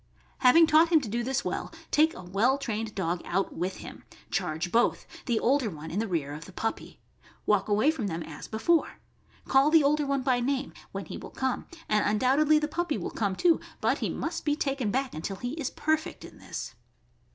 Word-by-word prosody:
Having 280 +6 +7
taught 320 +1 +5
him 330 -2 +6
to 255 - -5
do 235 +3 -2
this 265 +2 -1
well, - - -3 0.2
take 315 +2 +4
a 180 - -9
well 205 +9 +2
trained 225 -5 -4
dog 175 -2 -1
out 190 +2 -1
with 180 +3 -3
him; - - -10 0.3
charge 160 +3 -2
both, 235 +1 +2 0.2
the 235 -3 +2
older 265 -2 +2
one 160 -2 -8
in 185 - -1
the 225 - -1
rear 155 -6 -2
of 150 +2 -8
the - - -12
puppy; 225 +4 -4 0.5
walk 210 0 +2
away 215 +9 +4
from 260 -10 -3
them 165 -2 -3
as 150 -2 -9
before; 320 +10 +1 0.5
call 270 +2 +4
the 315 -1 +6
older 295 +1 +2
one 275 -1 0
by 250 -1 +2
name, 275 +2 -1 0.2
when - - -5
he - - -7
will - - -9
come, 260 -1 -2 0.2
and 210 -1 +2
undoubtedly 270 +9 +3
the 300 0 0
puppy 330 0 -1
will - - -4
come 200 -3 -1
too, 335 - +3 0.2
but - - +1
he - - -1
must 330 +1 -3
be 295 -1 +1
taken 275 -6 -1
back 265 +4 -1
until 165 +5 -4
he 245 +5 -4
is 300 -5 -3
perfect 315 0 -2
in - - -14
this. - - -6
250 Hz, 210 wpm, -28 LUFS, 200-295 Hz, 0.5 s, Having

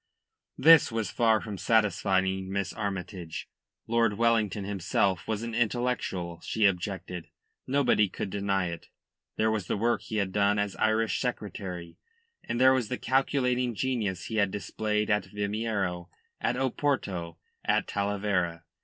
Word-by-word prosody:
This 160 -3 +7
was 110 -4 -2
far 115 -2 +3
from 105 -3 -6
satisfying 95 -3 +1
Miss 100 -3 -2
Armytage. 95 -5 -5 0.4
Lord 115 -2 +2
Wellington 110 -4 +2
himself 95 -1 0
was 110 0 -2
an 115 0 -4
intellectual, 115 -7 -1
she 110 -1 +1
objected. 90 -2 -1 0.4
Nobody 130 -7 +3
could 95 - -5
deny 95 -2 0
it. 85 - -7 0.5
There 110 0 +2
was 105 -4 -2
the - - 0
work 120 +3 +1
he 110 - -6
had 100 -3 0
done 100 +1 +2
as 105 -1 -1
Irish 110 0 +1
Secretary, 95 -8 -5 0.4
and 120 - -3
there 130 +1 +7
was 125 -4 0
the 125 - -2
calculating 125 -2 +1
genius 105 -7 -1
he 110 - -4
had 100 -2 +3
displayed 105 +2 -1
at 105 0 +2
Vimeiro, 100 -4 -2 0.3
at 120 - 0
Oporto, 120 - -1 0.3
at - - +2
Talavera. 100 -4 -1
105 Hz, 140 wpm, -28 LUFS, 95-115 Hz, 0.5 s, This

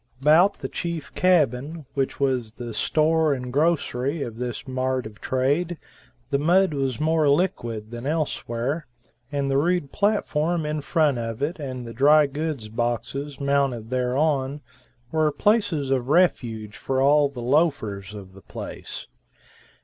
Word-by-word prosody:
About 160 +8 +5
the - - -5
chief 170 -4 -5
cabin, 155 -3 +1
which 135 -1 -1
was 130 -5 0
the 120 -2 -7
store 155 +5 +2
and 125 -1 -6
grocery 145 -2 +1
of 115 -3 -7
this 125 +1 -5
mart 130 -1 -1
of 110 0 -11
trade, 145 +7 0 0.5
the 140 - +2
mud 175 +3 +3
was 135 -3 -1
more 155 -1 +2
liquid 120 - 0
than 120 +2 -6
elsewhere, 145 -2 -2 0.4
and 140 -1 -1
the 135 - +3
rude 175 -2 0
platform 175 -6 0
in 150 0 -2
front 150 -4 +2
of 115 +2 -4
it 160 +4 -2
and 130 -4 -5
the 115 - -7
dry 150 +5 +6
goods 145 -4 -4
boxes 120 +5 -3
mounted 140 -5 0
thereon 135 +2 0 0.5
were 155 -1 +2
places 170 -5 +1
of 130 -1 0
refuge 115 - +1
for 130 -1 -1
all 145 +1 +4
the 125 -4 -7
loafers 120 - 0
of 95 -2 -10
the 95 - -14
place. - - -7
140 Hz, 145 wpm, -24 LUFS, 125-155 Hz, 0.5 s, dry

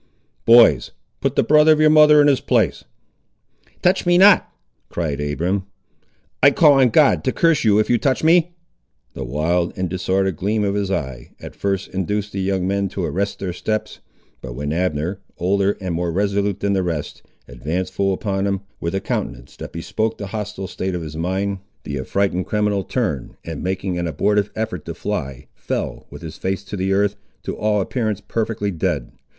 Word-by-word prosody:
Boys, 115 0 +6 0.3
put - - -1
the - - +3
brother 150 +1 +5
of 155 - +4
your 155 0 +5
mother 150 -1 +7
in - - +4
his 140 -3 +3
place." - - +1 1.0
"Touch 185 +2 +3
me 175 0 +3
not!" 195 +1 +6 0.4
cried 75 -4 -3
Abiram. 90 +7 -1 0.7
"I'll 140 +1 +6
call 150 -1 +6
on 130 -2 +5
God 145 +3 +4
to 130 - +1
curse 165 0 +2
you 105 -2 +4
if 110 - +2
you 120 - +2
touch 135 +4 0
me!" 170 +1 +4 0.6
The 65 - -5
wild 80 +7 -1
and 95 0 -1
disordered 95 0 -1
gleam 105 +4 0
of 100 -1 0
his 100 -1 -1
eye, 65 -10 -4
at - - -10
first 95 -1 -2
induced 105 +2 -2
the 95 - -3
young 95 -1 0
men 100 0 0
to 95 -1 -3
arrest 100 +3 -2
their 90 -2 -4
steps; 110 +3 -3 0.4
but 65 -2 -7
when 75 +2 -3
Abner, 90 +1 -1 0.2
older 100 +3 +1
and 95 -3 -3
more 85 +1 -1
resolute 100 +1 0
than 100 0 +1
the 95 - +1
rest, 80 -5 -4 0.3
advanced 75 +10 -4
full 100 0 +1
upon 95 +1 -1
him, 100 -1 -1 0.2
with 85 +3 -3
a 95 - -1
countenance - - -4
that - - -8
bespoke 110 +6 -2
the 100 - -5
hostile 105 -2 -4
state 95 0 -4
of 85 - -4
his 75 -1 -7
mind, 95 +4 -2 0.2
the 70 -2 -4
affrighted 95 +6 -1
criminal 105 -2 0
turned, 90 - -3
and, 80 -3 -6
making 95 -1 -2
an 85 - -2
abortive 100 +6 +1
effort 110 -7 -3
to - - -6
fly, 65 -2 -4
fell - - -4
with - - -11
his 80 -1 -8
face 95 +1 -2
to 105 - -7
the 95 0 -1
earth, 100 +1 +1 0.3
to - - -4
all 105 -1 +1
appearance 110 -1 -2
perfectly 110 -2 -2
dead. 85 - -2
95 Hz, 190 wpm, -20 LUFS, 90-105 Hz, 1.0 s, mother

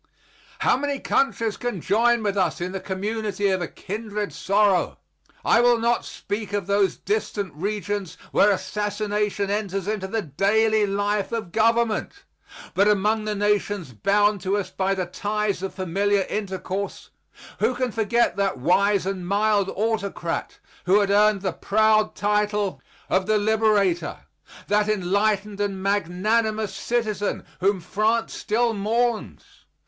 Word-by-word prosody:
How - - +4
many 285 +1 -2
countries 230 -7 0
can 245 -6 -3
join 225 +6 +2
with 205 -1 0
us 190 - 0
in 180 +1 -3
the 195 - -4
community 205 +1 -2
of 190 -1 0
a 175 - -2
kindred 210 +2 -5
sorrow! 200 -2 +2 0.5
I 230 - +5
will 240 -1 +5
not 235 +1 +1
speak 205 0 -5
of 205 -3 -1
those 200 -2 +1
distant 210 - -2
regions 200 +1 -3
where 205 - +5
assassination 205 0 -1
enters 195 -2 -2
into 210 -3 -2
the 220 +2 -2
daily 210 +7 +2
life 205 +1 -1
of 225 -7 -4
government. 230 - +1 0.5
But 200 +2 +3
among 210 +1 +2
the 210 -1 -1
nations 205 -6 0
bound 205 - +2
to 195 +2 0
us 200 - -3
by 195 0 0
the 185 -1 -2
ties 205 +2 -2
of 190 -1 -5
familiar 195 +2 +1
intercourse 195 -1 -4 0.5
who 255 - +1
can 250 -1 -1
forget 225 -1 +1
that 195 -4 0
wise 195 +8 +2
and 190 -2 -3
mild 205 0 +2
autocrat 200 -6 -2 0.3
who 195 +3 +5
had 200 -1 +1
earned 210 0 +4
the 190 -3 -1
proud 215 +2 +2
title 210 -1 0 0.3
of 190 +1 +1
the 215 0 +3
liberator? 210 -4 +1 0.5
that 210 +1 +2
enlightened 205 +1 0
and 195 -2 -2
magnanimous 205 +3 0
citizen 215 -2 -2
whom 195 +1 +2
France 215 +6 0
still 230 +2 0
mourns? 225 +3 -1
205 Hz, 140 wpm, -24 LUFS, 195-215 Hz, 0.5 s, I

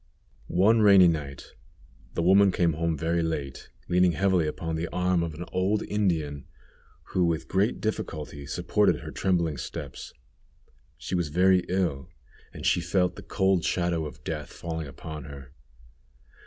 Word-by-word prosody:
One 110 +6 +4
rainy 100 -3 +7
night 70 -5 -3 0.6
the 85 - 0
woman 95 +2 +5
came 85 -2 +1
home 80 0 -1
very 85 +2 0
late, 75 -5 -4 0.2
leaning 90 0 +3
heavily 90 -1 +2
upon 80 +1 -3
the 80 +2 -2
arm 90 0 0
of 85 -2 -3
an 85 +3 -6
old 95 +3 0
Indian, 80 -9 -1 0.6
who 90 - +1
with 80 -1 0
great 100 +4 +1
difficulty 75 -9 -4
supported - - +1
her - - -7
trembling 85 -6 0
steps. - - -7 0.9
She - - -7
was 85 -3 +1
very 90 +4 +4
ill, 85 -5 -1 0.4
and - - -8
she 90 - +3
felt 90 +1 +1
the - - -9
cold 95 -3 +1
shadow 85 -3 0
of - - -12
death - - -5
falling 80 -2 -5
upon 75 +1 -8
her. 70 -2 -11
85 Hz, 150 wpm, -27 LUFS, 80-95 Hz, 0.9 s, rainy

